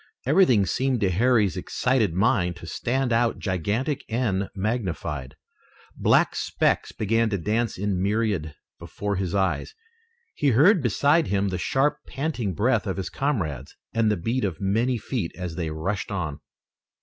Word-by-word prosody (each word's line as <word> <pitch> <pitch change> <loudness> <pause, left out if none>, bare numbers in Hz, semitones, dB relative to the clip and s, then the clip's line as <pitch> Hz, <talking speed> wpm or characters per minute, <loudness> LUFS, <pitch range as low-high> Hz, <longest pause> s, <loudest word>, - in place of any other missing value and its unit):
Everything 130 - +4
seemed 130 +4 0
to 95 -2 +2
Harry's 110 -1 +3
excited 125 -7 0
mind 95 -3 +2
to 90 - -11
stand 125 +7 -1
out 115 0 +2
gigantic 110 - -1
and 110 -5 0
magnified. 90 - -3 0.6
Black - - +3
specks - - 0
began 115 +2 +1
to 100 - -1
dance 110 +6 -1
in 95 -1 -1
myriads 100 -5 0 0.3
before 100 -1 -4
his 95 -1 -2
eyes. 100 - 0 0.6
He 145 - 0
heard 155 - +5
beside 145 +7 +2
him 100 0 +1
the 90 -2 -3
sharp, 135 +9 +1
panting 130 - -3
breath 110 +1 +1
of 95 - -2
his 95 - -4
comrades, 80 - -2 0.2
and 115 -1 +2
the 105 - +1
beat 115 +9 -1
of 95 -6 -2
many 115 +6 +1
feet 110 -6 -3
as 90 -2 -4
they 80 -1 -3
rushed 80 +6 -3
on. 85 -8 -3
105 Hz, 150 wpm, -25 LUFS, 95-125 Hz, 0.6 s, heard